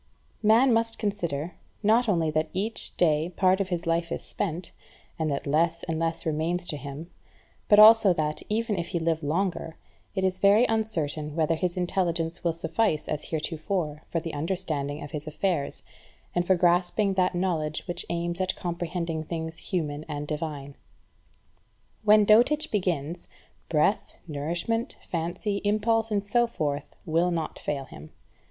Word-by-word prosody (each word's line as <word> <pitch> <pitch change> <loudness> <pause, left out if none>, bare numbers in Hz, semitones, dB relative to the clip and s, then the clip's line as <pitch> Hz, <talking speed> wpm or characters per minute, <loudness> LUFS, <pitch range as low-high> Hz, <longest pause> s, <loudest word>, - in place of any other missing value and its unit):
Man 230 +4 +5
must 230 0 +2
consider, 175 -6 -2 0.3
not 225 +3 +4
only 165 -5 +2
that 155 +1 0
each 210 +5 -1
day 155 -1 +2
part 185 +1 +3
of 190 - -2
his 175 -2 -2
life 165 0 0
is - - -3
spent, 175 -2 -3 0.5
and 160 -1 0
that 140 -1 -2
less 165 +3 +1
and 160 -1 -2
less 165 0 -2
remains 165 +3 -1
to 150 - -3
him, 140 +4 -8 0.6
but 205 - +7
also 215 -1 +9
that, 155 -3 -1
even 220 -1 0
if 170 - -3
he 170 - -2
live 165 -1 0
longer, 165 +1 -2 0.4
it 190 - 0
is 185 0 0
very 205 +5 +6
uncertain 160 - -2
whether 165 0 +2
his 175 +2 -2
intelligence 175 -2 -1
will 170 - +2
suffice 165 +1 0
as 150 - -3
heretofore 155 0 -3
for 165 - 0
the 165 0 -6
understanding 150 -3 -2
of 145 - -8
his 150 0 -5
affairs, 155 -1 -1 0.5
and 175 0 0
for 190 - +5
grasping 180 +3 +2
that 185 -1 +1
knowledge 165 -4 -1
which 175 -1 -3
aims 170 +1 -2
at 185 0 0
comprehending 170 -2 -3
things 160 0 -5
human 155 -6 -2
and 145 -1 -3
divine. 150 -2 -4 1.3
When 210 0 +6
dotage 245 +9 +4
begins, 175 -5 -2 0.4
breath, 165 +6 +1
nourishment, 170 - -2 0.2
fancy, 175 +5 -2
impulse, 220 +2 +1
and 205 -2 0
so 240 +4 +2
forth 145 -9 -3
will 165 +3 +2
not 165 -3 -3
fail 140 -2 -3
him. 75 - -12
170 Hz, 155 wpm, -27 LUFS, 155-195 Hz, 1.3 s, also